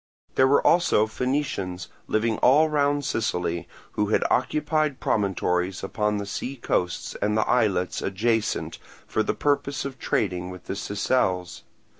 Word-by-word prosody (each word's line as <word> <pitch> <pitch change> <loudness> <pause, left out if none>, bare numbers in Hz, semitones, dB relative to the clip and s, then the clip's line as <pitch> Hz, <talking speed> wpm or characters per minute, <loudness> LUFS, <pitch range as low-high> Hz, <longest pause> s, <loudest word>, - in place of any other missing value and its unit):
There 130 - +4
were 140 - +3
also 165 -11 +4
Phoenicians 110 -7 -2 0.2
living 110 0 0
all 150 +5 +5
round 145 -1 +1
Sicily, 90 -8 -1 0.2
who 105 - 0
had 110 - +2
occupied 150 +1 +1
promontories 95 -2 0
upon 105 +2 -1
the 100 - -3
sea 125 +6 -4
coasts 90 -8 -2
and 105 +1 +1
the 110 - +1
islets 100 -7 +1
adjacent 110 +3 -1 0.3
for - - 0
the - - -1
purpose 140 -1 0
of 135 -2 -6
trading 90 -3 -1
with 90 0 -9
the - - -4
Sicels. 100 -3 -1
110 Hz, 140 wpm, -25 LUFS, 95-135 Hz, 0.3 s, all